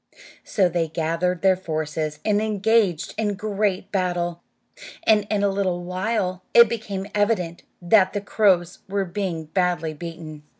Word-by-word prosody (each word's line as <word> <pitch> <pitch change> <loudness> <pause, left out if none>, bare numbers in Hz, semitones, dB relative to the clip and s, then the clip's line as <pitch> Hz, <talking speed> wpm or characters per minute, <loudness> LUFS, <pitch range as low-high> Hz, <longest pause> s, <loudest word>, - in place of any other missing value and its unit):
So 195 -4 +2
they 170 -1 -1
gathered 165 +3 -1
their 190 -1 +5
forces 155 -3 -3
and 210 -1 +2
engaged 210 -4 +1
in 215 -2 +1
a - - -1
great 205 -2 -1
battle, 175 -3 -1 0.6
and 210 -2 +3
in 205 -2 0
a - - +4
little 190 -3 -1
while 185 0 -2
it 235 0 +9
became 205 -4 -4
evident 205 -5 0 0.2
that 190 +1 +4
the 205 - -2
crows 190 -4 +2
were 200 0 0
being 175 -3 -3
badly 170 -1 -1
beaten. 160 -1 -8
185 Hz, 145 wpm, -23 LUFS, 170-205 Hz, 0.6 s, it